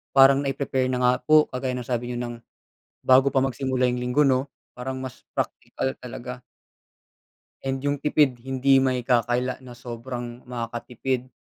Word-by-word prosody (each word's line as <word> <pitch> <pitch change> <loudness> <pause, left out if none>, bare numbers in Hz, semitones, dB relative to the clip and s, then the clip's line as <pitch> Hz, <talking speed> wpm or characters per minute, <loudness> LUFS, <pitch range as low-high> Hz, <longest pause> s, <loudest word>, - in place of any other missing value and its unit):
parang 135 +1 +7
nai-prepare 135 -1 0
na 125 - 0
nga 125 0 +5
po 155 0 +6
kagaya 130 0 -2
ng 125 -2 -5
sabi 120 -1 -2
niyo 120 - -3
ng 120 -1 -4 0.7
bago 130 +1 +6
pa 135 - +3
magsimula 130 0 -1
yung 125 - -2
linggo 125 +4 +2
'no? 130 +1 +2 0.3
Parang 130 +1 -4
mas 130 -2 -7 0.2
praktikal 130 - -2
talaga. 125 0 -7 1.3
And 135 0 -1
yung 145 0 0
tipid 145 -3 +2
hindi 135 +2 +3
maikakaila 125 -1 +1
na 125 - -9
sobrang 120 0 -7
makakatipid. 125 +1 -3
130 Hz, 145 wpm, -25 LUFS, 125-135 Hz, 1.3 s, parang